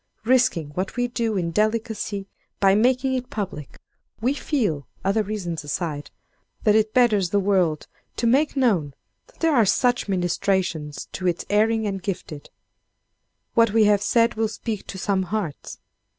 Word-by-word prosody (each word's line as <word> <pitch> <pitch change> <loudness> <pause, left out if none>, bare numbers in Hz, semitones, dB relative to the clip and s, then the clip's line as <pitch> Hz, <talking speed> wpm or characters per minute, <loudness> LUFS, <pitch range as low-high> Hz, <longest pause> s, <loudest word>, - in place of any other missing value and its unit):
Risking 240 - +2
what 185 +6 -4
we 245 0 +1
do, 230 -3 -1
in 170 -2 -1
delicacy, 215 -1 -1 0.3
by 195 -1 +5
making 255 +5 +2
it 255 -1 -3
public, 190 -9 -5 0.4
we 250 +5 +1
feel—other 200 - -1
reasons 190 -7 -4
aside—that 150 - -4
it 215 0 +3
betters 215 -7 +3
the 205 - +2
world 185 -6 +1 0.3
to 235 - -2
make 275 +5 +2
known 180 - +1 0.3
that - - -25
there 325 -3 +3
are 235 - +5
such 245 +4 +2
ministrations 175 -4 -1
to 185 - -3
its 175 -1 -1
erring 220 +1 +2
and 195 -2 -3
gifted. 175 -6 -6 1.0
What 230 -3 +4
we 225 -1 +5
have 205 -1 +4
said 230 +2 +3
will 220 0 0
speak 215 -1 -5
to 190 - -7
some 190 0 0
hearts. 185 -5 -4
205 Hz, 150 wpm, -23 LUFS, 180-230 Hz, 1.0 s, by